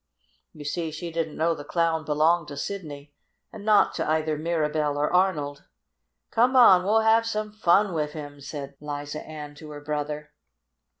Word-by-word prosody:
You 150 -1 -11
see 165 +3 -2
she 160 +2 -6
didn't 160 -2 -3
know 165 +1 +2
the 145 - -8
Clown 165 -1 0
belonged 155 +2 +2
to 145 - -8
Sidney, 145 -5 -6 0.4
and 215 -2 -9
not 210 -1 +4
to - - -2
either 155 0 +1
Mirabell 150 -2 -1
or 150 +3 0
Arnold. 150 -7 +1 0.7
"Come 245 +3 +3
on, 190 -8 +7
we'll 215 +3 +3
have 225 +1 +4
some 215 -1 -2
fun 205 -1 +3
wif 150 -2 -2
him!" 145 -2 -8
said 140 0 -7
Liza 145 0 -5
Ann 150 -2 -8
to 150 +1 -12
her 145 -1 -8
brother. 150 0 -4
155 Hz, 170 wpm, -26 LUFS, 150-180 Hz, 0.7 s, on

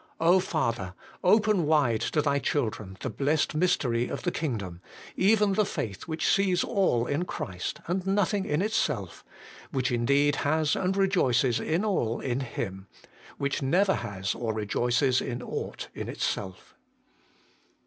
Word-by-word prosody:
O 175 +3 +5
Father! 115 - -2 0.3
open 210 -4 +4
wide 135 -8 +3
to 150 +5 0
Thy 140 -1 +2
children 110 -9 -2
the 130 - -2
blessed 145 +9 0
mystery 125 -8 +1
of - - -5
the 175 - 0
Kingdom, 100 - -4 0.3
even 205 0 +3
the 215 - +3
faith 105 - -4
which 160 -1 -2
sees 190 -3 +3
all 190 - +1
in 145 +6 -1
Christ 90 - -5
and 185 +2 -2
nothing 200 0 +1
in 150 +2 0
itself; 160 - -1 0.5
which 130 -2 -1
indeed 140 +4 +2
has 155 +1 +1
and 190 +1 0
rejoices 135 - +2
in 170 +7 0
all 120 - 0
in 125 -1 -2
Him; 100 -7 -5 0.5
which 140 -1 -1
never 185 +8 +3
has 95 -1 -3
or 115 -2 -3
rejoices 120 +5 +1
in 120 -1 -4
ought - - -5
in - - -5
itself. 95 -2 -4
140 Hz, 145 wpm, -28 LUFS, 115-185 Hz, 0.5 s, O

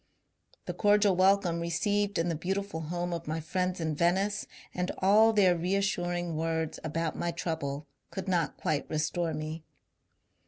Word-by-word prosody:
The - - -3
cordial 205 -2 +4
welcome 185 -2 +3
received 200 +5 0
in 165 - +1
the 170 - 0
beautiful 190 +2 -2
home 175 +2 -3
of 170 -1 -5
my 160 +1 -1
friends 180 +3 -2
in 160 -2 -1
Venice, 190 +6 +1 0.3
and 180 0 -1
all 210 +4 +5
their 195 -5 +4
reassuring 175 -1 -1
words 160 0 -1
about 160 0 -2
my 175 - -1
trouble, 160 -4 -3 0.2
could 190 - -6
not 175 -3 0
quite 150 -2 -1
restore 155 +1 -1
me. 155 +1 -5
175 Hz, 150 wpm, -30 LUFS, 160-195 Hz, 0.3 s, all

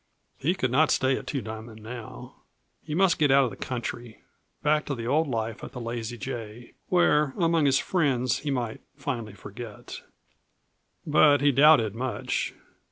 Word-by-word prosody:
He 165 +7 +1
could 130 -8 -1
not 150 +4 +4
stay 130 0 +2
at - - -7
Two 140 - -2
Diamond 110 0 -8
now. 110 - -9 0.4
He 150 - -5
must 190 0 +3
get 150 -2 +4
out 135 +1 +6
of 125 - -1
the - - -8
country, 120 -2 -6 0.4
back 150 0 +3
to 140 - -2
the 115 -2 -6
old 150 +6 +2
life 115 -3 -3
at - - -8
the 125 - -6
Lazy 120 0 -4
J, 115 +2 -7 0.2
where 150 -6 +3
among 165 -3 +3
his 135 0 +4
friends 135 -9 +1
he 150 - -4
might 120 -5 -2
finally 125 -8 -4
forget. 105 +3 -9 1.0
But 150 -1 +5
he 145 0 +4
doubted 135 -6 +5
much. 125 +2 -2
130 Hz, 165 wpm, -26 LUFS, 115-150 Hz, 1.0 s, out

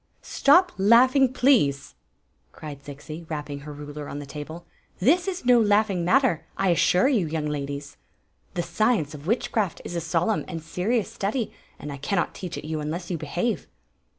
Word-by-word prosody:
" - - -42 0.2
Stop 360 +6 +6
laughing, 250 +6 +5
please!" 240 - +2 0.6
cried 145 -3 -9
Zixi, 155 +3 -9
rapping 145 -2 -4
her 150 +2 -9
ruler 145 0 -8
on - - -6
the 145 - -6
table. 155 +4 -8 0.3
"This 330 - +3
is 370 -7 -4
no 245 -1 +6
laughing 205 -4 +2
matter, 230 - +3
I 195 -1 +2
assure 175 +4 +4
you, 225 - +2
young 155 0 -2
ladies. 145 -1 -4 0.6
The 175 - 0
science 170 - +1
of 150 +1 -10
witchcraft 215 -3 0
is 175 - -5
a 170 - -1
solemn 170 +6 0
and 170 -3 -5
serious 200 +7 -1
study, 215 +4 -2 0.2
and 150 - -7
I - - -7
cannot 175 +6 -1
teach 180 -3 -6
it - - -7
you 155 0 -3
unless 165 +4 -4
you 170 - -1
behave." 175 +10 -2
170 Hz, 175 wpm, -25 LUFS, 150-225 Hz, 0.6 s, Stop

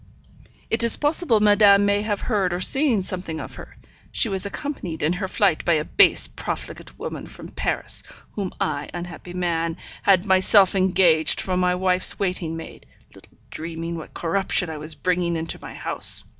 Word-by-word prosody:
It 225 +1 +4
is 235 - +4
possible 295 - +3
madame 205 -1 +5
may 205 0 +1
have 210 -1 -3
heard 195 -6 -1
or - - -4
seen 250 0 +2
something 180 -4 -5
of - - -8
her; - - -12 0.3
she 230 - +1
was 195 0 -2
accompanied 200 - -6
in 155 +3 +1
her 190 +2 -3
flight 195 -4 +1
by 170 - +2
a 155 -1 0
base, 400 - +5
profligate - - -7
woman - - -7
from - - -11
Paris, - - 0 0.3
whom 195 -3 -4
I, 145 -1 -3
unhappy 175 0 -8
man, 170 -2 -2 0.2
had 190 -1 +3
myself 190 0 +4
engaged 180 -4 +3
for 185 - -2
my 180 0 +1
wife's 185 0 +1
waiting 180 -4 -3
maid, 165 - -11 0.3
little - - -19
dreaming 165 +1 -6
what 160 - -10
corruption 180 0 -1
I 155 - -7
was 155 +1 -5
bringing 175 -2 -1
into 165 0 -4
my - - -10
house!' - - +3
185 Hz, 170 wpm, -22 LUFS, 165-200 Hz, 0.3 s, madame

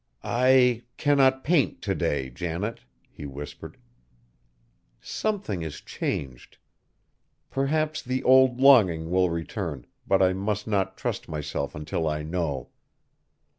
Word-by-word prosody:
"I 125 +1 +4 0.2
cannot 135 -2 +3
paint 145 - +1
to - - 0
day, 65 -3 -1
Janet," 90 - -4 0.3
he 75 - -8
whispered. 70 +1 -9 1.2
"Something 205 - -3
is 80 -2 -6
changed. 65 -3 -5 0.9
Perhaps 155 +3 0
the 130 +1 -3
old 130 -1 +5
longing 95 -12 +5
will 90 0 +3
return, 85 - -4 0.2
but 95 - +3
I 95 0 +3
must 105 +2 -2
not 100 -3 -1
trust - - -4
myself 75 -2 -4
until 75 +2 -3
I 75 0 -2
know. 80 -5 -3
95 Hz, 115 wpm, -26 LUFS, 75-130 Hz, 1.2 s, old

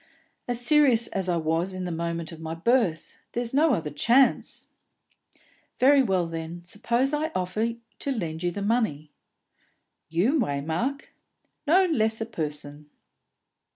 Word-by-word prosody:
"As 245 -1 -1
serious 245 -2 +4
as 190 -1 -2
I 175 - +1
was 165 +4 -1
in 185 -1 -4
the 180 - -3
moment 170 0 -3
of 165 - -10
my 160 0 -5
birth! 190 -3 0 0.2
There's 240 0 -2
no 295 -1 +4
other 155 -5 -4
chance." 240 - +2 1.1
"Very 275 +2 +6
well, 190 -8 +1
then, 165 +1 -6
suppose 235 - 0
I 305 +2 0
offer 210 +6 -1 0.3
to 280 - -2
lend 165 -10 -3
you 175 - +1
the 200 +3 -5
money." 200 -10 0 1.0
"You, 205 - +2
Waymark?" 165 - -2 0.6
"No 370 +5 +5
less 220 -10 +1
a 225 - -2
person." 150 -7 -6
195 Hz, 140 wpm, -26 LUFS, 165-245 Hz, 1.1 s, Very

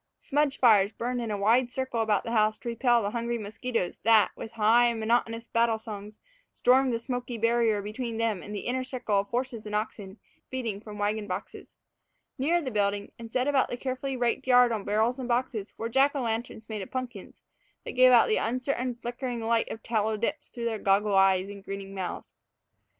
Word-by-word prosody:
Smudge 290 -1 0
fires 210 -5 +5
burned 245 +2 -3
in 230 - -3
a 210 - -1
wide 235 +5 +3
circle 260 -2 -2
about 215 -3 +1
the 230 - -5
house 215 -1 +2
to - - -10
repel 235 0 +2
the 200 - -1
hungry 235 +1 -2
mosquitos 220 -2 -3
that, 220 -1 +4
with 225 - -8
high, 230 +2 +4
monotonous 230 +1 0
battle 230 -1 +1
songs, 210 -1 -9 0.3
stormed 260 +1 +3
the 230 - 0
smoky 245 0 -4
barrier 230 -2 +2
between 225 +2 -4
them 225 -5 0
and 210 - -7
the 200 - -3
inner 255 +1 -2
circle 250 -6 -1
of 200 - -2
horses 240 -1 -3
and 210 - -3
oxen 210 -2 -4 0.3
feeding 230 -6 -3
from 210 -1 -9
wagon 205 0 -1
boxes. 185 - -7 0.6
Nearer 335 +6 +2
the 260 - -3
building, 205 -1 0
and 230 -1 -9
set 255 +2 0
about 280 -2 +2
the 245 - -4
carefully 260 +1 -3
raked 245 +2 -1
yard 245 -1 +6
on 215 -3 -3
barrels 220 +5 +1
and 255 - -4
boxes, 235 -4 -1
were 225 - -3
Jack 270 +5 +3
o' 275 - -1
lanterns 225 -1 -3
made 215 -2 -4
of 190 - -7
pumpkins, 250 -6 -6 0.4
that - - -4
gave 255 0 +6
out 240 -2 +6
the 215 - +2
uncertain, 250 +1 -1
flickering 240 +1 -4
light 225 0 +1
of 225 - -7
tallow 220 -1 0
dips 230 - -3
through 235 -1 -6
their 225 -2 -1
goggle 200 +1 +2
eyes 195 -1 +4
and 200 -1 -10
grinning 195 0 -7
mouths. 190 -2 -5
230 Hz, 200 wpm, -28 LUFS, 210-250 Hz, 0.6 s, yard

